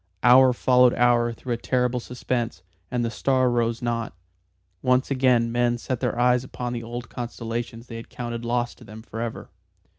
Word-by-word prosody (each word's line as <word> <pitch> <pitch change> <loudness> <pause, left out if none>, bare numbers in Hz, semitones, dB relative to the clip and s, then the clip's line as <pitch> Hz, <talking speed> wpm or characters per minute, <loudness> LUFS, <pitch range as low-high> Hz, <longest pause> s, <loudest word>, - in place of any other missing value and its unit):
Hour 130 +1 +7
followed 125 0 +4
hour 120 -1 +3
through 120 +2 -4
a - - -2
terrible 125 +1 0
suspense, 120 -4 -3 0.3
and 120 -1 -1
the 115 - -2
star 130 +2 +2
rose 115 0 0
not. 115 -1 -2 0.7
Once 125 +2 +2
again 125 -3 +3
men 120 0 +1
set 125 +1 -3
their - - -1
eyes 125 0 +3
upon 125 -1 -5
the 120 - -3
old 120 +1 -6
constellations 115 -1 -5
they 115 -2 -8
had 115 - -10
counted 120 -1 -5
lost 120 0 -1
to - - -13
them 110 +2 -11
forever. 115 0 -6
120 Hz, 175 wpm, -24 LUFS, 115-125 Hz, 0.7 s, Hour